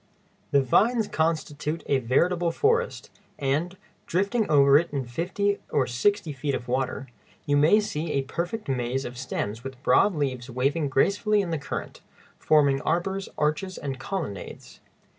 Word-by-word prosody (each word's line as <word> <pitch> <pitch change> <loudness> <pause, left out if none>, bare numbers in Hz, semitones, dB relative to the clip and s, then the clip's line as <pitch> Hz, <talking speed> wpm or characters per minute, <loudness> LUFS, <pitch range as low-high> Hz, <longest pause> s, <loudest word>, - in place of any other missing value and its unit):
The 140 -1 +3
vines 220 - +3
constitute 160 -1 -2
a 140 - +2
veritable 170 +8 +1
forest, 460 - 0 0.3
and, 155 +7 -1 0.3
drifting 200 +5 0
over 140 -2 +6
it 170 - -3
in 140 -3 -2
fifty 185 +10 -1
or 140 -3 +2
sixty 155 - 0
feet 135 +1 -2
of 120 - -6
water, 130 +1 -1 0.4
you 145 -1 +2
may 155 +9 +5
see 165 -7 -3
a 140 - +1
perfect 175 - -4
maze 130 0 -1
of 120 - -6
stems 115 -3 -4
with 135 0 -9
broad 200 +4 +4
leaves 130 -4 -2
waving 140 +4 0
gracefully 205 - +2
in 180 -4 -4
the 160 - -1
current, 140 - -6 0.4
forming 140 -3 +3
arbors, 190 +4 -1
arches, 155 +5 -1
and 135 -3 -5
colonnades. 140 - -6
150 Hz, 150 wpm, -26 LUFS, 135-185 Hz, 0.4 s, over